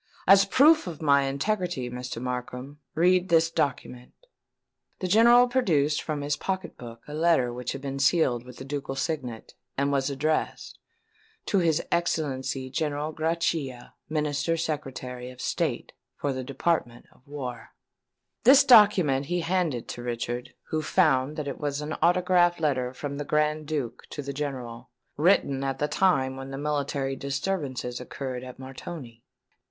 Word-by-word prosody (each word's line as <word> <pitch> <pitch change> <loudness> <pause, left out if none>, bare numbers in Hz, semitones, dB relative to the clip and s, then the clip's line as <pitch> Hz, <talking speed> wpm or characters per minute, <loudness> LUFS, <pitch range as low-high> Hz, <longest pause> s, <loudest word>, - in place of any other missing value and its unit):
As 195 +1 +8
a - - -6
proof 305 - +5
of 165 -4 -6
my 140 -3 +4
integrity, 170 0 -1
Mr. 125 -1 -6
Markham, 125 +3 -5 0.2
read 180 +2 +3
this 165 0 +4
document." 125 -4 -3 0.8
The 185 - -3
General 235 +5 +6
produced 160 - +1
from 150 -2 -3
his 145 0 0
pocket 190 -2 -4
book 115 -1 -11
a 150 - -8
letter 155 -6 +2
which 125 0 -4
had 135 - -7
been 140 0 -4
sealed 135 -4 +2
with 125 -1 -12
the 130 - -8
ducal 140 -1 -4
signet, 135 -6 -4 0.2
and 140 +1 +1
was 140 0 +1
addressed 150 +3 -2 0.7
"To 200 - +2
His 165 -2 +2
Excellency 135 -6 -1
General 150 +2 -2
Grachia, 160 -6 -2 0.2
Minister 150 +1 0
Secretary 130 -6 -4
of 125 0 -13
State - - -2 0.2
for 140 -1 -1
the 130 0 -4
Department 135 -2 -1
of - - -25
War." 130 -5 -6 0.7
This 270 +3 +8
document 190 - +5
he 175 +1 0
handed 165 -7 -1
to 120 - -6
Richard, 120 0 -4
who 155 - -1
found 135 -2 +2
that 150 -2 -4
it 140 - -5
was 145 -1 -2
an 150 +1 -4
autograph 175 0 +3
letter 130 -5 0
from 140 +2 -6
the - - -2
Grand 150 +1 0
Duke 140 -7 -4
to 145 - -6
the 140 0 -5
General, 130 -4 -5 0.3
written 145 -4 +2
at 135 -1 -2
the 150 - 0
time 135 -6 +1
when 135 0 -7
the 135 - -6
military 140 -2 -1
disturbances 135 -3 -3
occurred 125 0 -5
at 125 -1 -9
Montoni. 130 -2 -9
145 Hz, 155 wpm, -27 LUFS, 130-165 Hz, 0.8 s, As